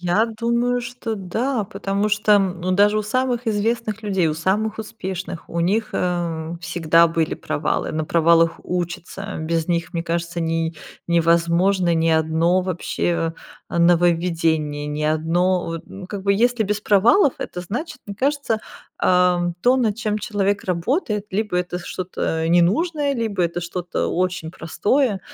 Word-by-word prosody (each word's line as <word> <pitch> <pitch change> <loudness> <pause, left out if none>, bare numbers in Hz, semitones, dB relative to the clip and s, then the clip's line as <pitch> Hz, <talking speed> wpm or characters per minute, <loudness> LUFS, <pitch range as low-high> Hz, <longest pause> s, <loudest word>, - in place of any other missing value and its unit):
Я 180 +5 +2
думаю, 235 +2 0
что 240 -2 -5
да, 220 +5 -1
потому 200 +1 -2
что, 210 0 +2
м, 190 -3 +2
ну, 185 +1 -1
даже 205 +2 +4
у - - -1
самых 245 +2 -1
известных 225 +1 -1
людей, 195 -5 +1
у 155 - -1
самых 200 +7 0
успешных, 190 -5 -6
у 170 - -2
них, 210 +6 +1
эм, 170 -2 -2
всегда 170 -1 +3
были 165 -1 -1
провалы. 150 0 -2
На 155 0 -1
провалах 165 +1 +3
учатся. 180 +3 -4
Без 165 +1 -1
них, 170 0 -1
мне 165 - -1
кажется, 170 0 -2
не 165 0 -1 0.3
невозможно 170 +2 +3
ни 165 0 +2
одно 160 +3 +2
вообще, 170 -2 -1 0.4
э, - - -2
нововведение. 165 -3 +2
Ни 150 +1 -3
одно 170 +4 +1
вот, 165 -1 -4
ну, 190 -2 -9
как 200 -2 -5
бы 200 - +4
если 240 +2 +2
без 210 +1 -1
провалов, 235 - +4
это 180 - -5
значит, 245 - -5
мне 200 - -7
кажется, 275 -2 0 0.4
ам, 180 -1 +2
то, 250 +2 +4
над 225 -5 +1
чем 215 -2 -1
человек 200 -1 -1
работает, 210 - -1
либо 210 -1 -1
это 180 0 -2
что-то 175 -2 -3
ненужное, 280 - +2
либо 220 -6 -1
это 170 +1 -2
что-то 175 0 -3
очень 180 -2 -1
простое, 205 - 0
180 Hz, 150 wpm, -21 LUFS, 170-215 Hz, 0.4 s, даже